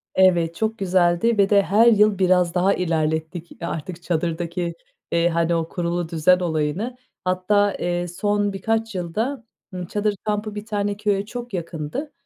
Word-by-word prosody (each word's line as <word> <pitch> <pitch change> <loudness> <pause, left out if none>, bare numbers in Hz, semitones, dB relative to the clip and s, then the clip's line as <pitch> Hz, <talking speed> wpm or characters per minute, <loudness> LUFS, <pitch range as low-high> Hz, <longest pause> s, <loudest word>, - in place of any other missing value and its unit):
Evet, 175 -3 +4
çok 220 +3 -1
güzeldi 185 +3 +2
ve 200 -1 +4
de 200 -1 +5
her 210 +6 +4
yıl 210 -3 +4
biraz 180 -2 +3
daha 185 +2 +3
ilerlettik 160 -1 -1
artık 170 +1 -5
çadırdaki, 170 +1 -2 0.4
eee, 170 0 +3
hani 170 0 +1
o 165 -1 -1
kurulu 175 -1 -2
düzen 170 +3 +3
olayını. 170 +8 -2 0.3
Hatta, 195 +2 +2
eee, 175 0 -1
son 205 +3 0
birkaç 225 +2 -1
yılda, 220 +10 -2 0.3
ııı, 180 -1 -5
çadır 210 +2 -1
kampı 210 0 -2
bir 210 0 -6
tane 205 -2 -2
köye 205 -1 0
çok 240 +1 -7
yakındı. 170 - -4
185 Hz, 150 wpm, -22 LUFS, 170-210 Hz, 0.4 s, de